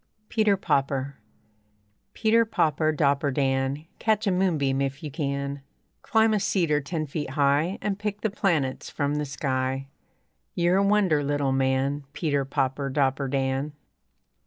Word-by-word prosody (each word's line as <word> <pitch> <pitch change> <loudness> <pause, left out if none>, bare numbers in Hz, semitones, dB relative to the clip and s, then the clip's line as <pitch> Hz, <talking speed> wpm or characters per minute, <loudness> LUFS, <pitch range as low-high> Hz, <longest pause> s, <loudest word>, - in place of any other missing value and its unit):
PETER, 215 -3 +2
POPPER 140 -5 -1 1.0
Peter, 225 +1 +4
popper, 155 -7 +1
dopper, 140 -2 +1
Dan, 135 +1 0
Catch 220 -1 +1
a 195 - +2
moonbeam 155 -8 +1
if 135 +1 -3
you 150 - -5
can; 140 -1 -3 0.4
Climb 220 0 +3
a 210 - +2
cedar 165 -7 +1
ten 155 +2 -3
feet 150 +1 -4
high 145 +6 +1
And 205 -1 -1
pick 205 0 -3
the 220 - 0
planets 160 -10 0
from 145 0 -1
the 150 - -1
sky. 135 -1 -2 0.7
You're 175 +1 +3
a 200 - +3
wonder, 200 -7 +3
little 145 -1 0
man 135 +2 0
Peter, 145 -5 0
popper, 135 +1 -1
dopper, 135 0 +1
Dan. 135 +2 -1
145 Hz, 140 wpm, -26 LUFS, 135-180 Hz, 1.0 s, Peter